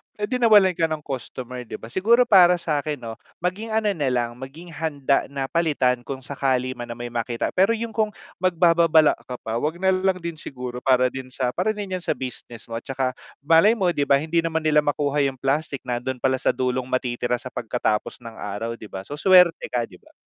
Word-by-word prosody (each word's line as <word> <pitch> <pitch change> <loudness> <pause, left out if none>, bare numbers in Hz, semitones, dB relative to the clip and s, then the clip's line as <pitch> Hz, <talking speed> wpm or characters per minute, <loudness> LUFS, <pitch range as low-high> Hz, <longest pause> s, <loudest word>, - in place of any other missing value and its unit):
edi 210 +4 -2
nawalan 210 -5 +6
ka 165 -1 +1
ng 155 -2 -4
customer 125 -1 -6
'di - - -8
ba. 115 - -10
Siguro 235 - +3
para 180 -4 +6
sakin 150 -3 -2
'no, 115 -1 -7 0.2
maging 195 +6 -3
ano 220 -1 +1
nalang, 125 -5 -1
maging 135 +7 -10
handa 145 -4 -1
na 135 -1 -3
palitan 135 -7 +1
kung 135 0 -6
sakali 130 -1 -1
man 120 -1 -7
na - - -5
may 120 - -4
makita, 120 0 -2
pero 195 +4 +4
yung 230 -1 -3
kung 215 -1 +1 0.3
magbababala 170 -3 +4
ka 125 -1 -7
pa, 110 +1 -4
'wag 155 +8 -2
na 190 0 +3
lang 185 0 0
din 170 -1 -5
siguro 125 -4 -7
para 130 -1 +4
din 130 0 -7
sa 125 -1 -2
para 200 +5 +1
din 200 -3 -4
'yan 180 - -6
sa - - 0
business 120 -3 -8
mo. 115 - -6
At 115 - -5
tsaka, 130 -1 -2 0.3
malay 200 +9 +5
mo 180 -2 +2
'di 145 - +1
ba, 140 - +5
hindi 165 +3 0
naman 160 -1 -1
nila 150 -1 +4
makuha 145 0 0
yung 135 -2 -2
plastic, 140 +1 -1
nandun 125 +1 -3
pala 130 +1 +2
sa - - +1
dulong 125 0 -2
matitira 125 -1 -1
sa 125 - -8
pagkatapos 110 -2 -2
ng 115 -1 -9
araw 105 +3 -4
'di 110 - -11
ba? 95 0 -6
So 145 - -5
swerte 180 -1 +5
ka 120 -1 0
'di 90 - -16
ba. - - -22
140 Hz, 215 wpm, -23 LUFS, 125-175 Hz, 0.3 s, nawalan